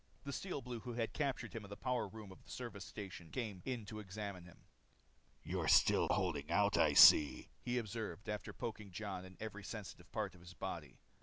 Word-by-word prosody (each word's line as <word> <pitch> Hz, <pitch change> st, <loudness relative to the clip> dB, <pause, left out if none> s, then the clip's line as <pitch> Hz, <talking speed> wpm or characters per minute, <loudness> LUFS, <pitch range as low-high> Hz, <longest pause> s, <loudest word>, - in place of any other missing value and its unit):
The 140 Hz, 0 st, -4 dB
Steel 180 Hz, -5 st, -3 dB
Blue 120 Hz, -1 st, -5 dB
who 120 Hz, +2 st, -6 dB
had 115 Hz, -1 st, -2 dB
captured 135 Hz, -5 st, -1 dB
him 115 Hz, -, -5 dB
in 100 Hz, -, -10 dB
the 100 Hz, -, -7 dB
power 125 Hz, -4 st, 0 dB
room 105 Hz, -1 st, -10 dB
of 95 Hz, -, -13 dB
the -, -, -20 dB
service 115 Hz, -6 st, -6 dB
station 95 Hz, -5 st, -8 dB
came 105 Hz, -5 st, -4 dB
in 125 Hz, -5 st, -3 dB
to 110 Hz, +1 st, -6 dB
examine 100 Hz, -2 st, -6 dB
him. 90 Hz, -, -16 dB, 0.8 s
"You're -, -, -2 dB
still -, -, +6 dB
holding 80 Hz, -6 st, 0 dB
out, 100 Hz, +3 st, +3 dB
I -, -, +5 dB
see," 75 Hz, -4 st, +8 dB
he 125 Hz, 0 st, -1 dB
observed 110 Hz, -3 st, -4 dB
after 105 Hz, -1 st, -3 dB
poking 105 Hz, -3 st, -5 dB
Jon 95 Hz, -1 st, -5 dB
in 95 Hz, 0 st, -13 dB
every 105 Hz, -2 st, -6 dB
sensitive 100 Hz, -4 st, -8 dB
part -, -, -2 dB
of 90 Hz, -, -16 dB
his 85 Hz, 0 st, -12 dB
body. -, -, -5 dB
105 Hz, 205 wpm, -38 LUFS, 95-115 Hz, 0.8 s, see